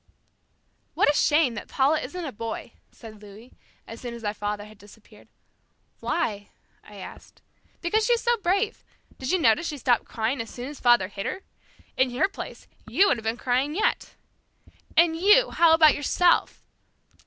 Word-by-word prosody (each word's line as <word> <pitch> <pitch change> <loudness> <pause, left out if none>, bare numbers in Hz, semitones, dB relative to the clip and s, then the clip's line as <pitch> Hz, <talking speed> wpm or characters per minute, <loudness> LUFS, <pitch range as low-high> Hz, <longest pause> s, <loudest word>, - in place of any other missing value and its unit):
"What 290 - +4
a - - -4
shame 295 -3 +2
that 220 - -7
Paula 285 +3 +1
isn't 360 -1 -6
a 285 - -5
boy," 230 0 -6 0.2
said 215 -2 -13
Louis, 210 +4 -14 0.3
as 230 - -10
soon 240 -2 -6
as 235 - -11
our 205 -1 -2
father 205 0 -4
had 215 -1 -16
disappeared. 205 +2 -18 0.7
"Why?" 210 -12 -2 0.3
I 210 - -15
asked. 190 - -12 0.4
"Because 430 +5 +1
she 485 - +4
is 470 - 0
so 480 0 +2
brave. 400 +2 -1 0.4
Did 260 - -5
you 370 - +3
notice 285 +1 +2
she 295 - -5
stopped 245 -3 +1
crying 230 +3 -2
as 225 - -8
soon 250 +2 -7
as 295 - -10
father 240 -6 +4
hit 195 0 -6
her? 385 - -5 0.5
In 260 0 +3
her - - +3
place, 395 - -9 0.2
you 400 +1 +3
would - - +2
have 225 - -9
been 225 +2 -2
crying 260 +5 -1
yet." 425 - -1 0.8
"And 335 -1 +5
you? 420 +9 +4
How 335 -1 +4
about 315 -2 +6
yourself?" 345 +4 +1
260 Hz, 175 wpm, -25 LUFS, 220-340 Hz, 0.8 s, about